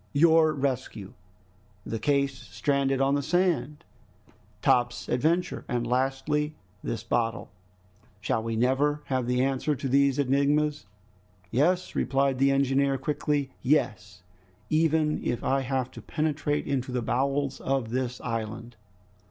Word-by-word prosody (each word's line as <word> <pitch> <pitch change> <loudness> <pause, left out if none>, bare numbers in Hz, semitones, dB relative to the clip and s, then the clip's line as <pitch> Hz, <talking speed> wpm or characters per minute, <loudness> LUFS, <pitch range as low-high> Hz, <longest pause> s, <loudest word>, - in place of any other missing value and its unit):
Your 160 +1 +5
rescue, 125 -6 -3 0.7
the 115 - -3
case 140 +2 +1
stranded 135 0 -1
on 135 +1 +3
the 145 - +1
sand, 155 -3 0 0.8
Top's 120 0 +2
adventure, 165 +8 0
and 120 -1 -1
lastly 135 +5 0 0.3
this 115 -1 -3
bottle... 115 -3 -1 0.7
Shall 110 +1 -1
we 115 0 -3
never 140 +5 +1
have 130 -3 -1
the 125 +1 +2
answer 135 +2 0
to 135 - -4
these 140 0 +3
enigmas?" 145 -1 +1 0.6
"Yes!" 175 +8 +1
replied 135 0 +1
the 135 +1 +4
engineer 135 0 +2
quickly, 145 -1 -1
"yes, 105 -9 0 0.5
even 155 -1 +2
if 120 - -2
I 135 0 +1
have 130 -1 -2
to - - -10
penetrate 150 -1 -1
into 130 -2 -2
the 125 -1 -1
bowels 135 +3 0
of 135 -4 -1
this 125 0 -2
island!" 115 0 -5
135 Hz, 125 wpm, -27 LUFS, 125-145 Hz, 0.8 s, Your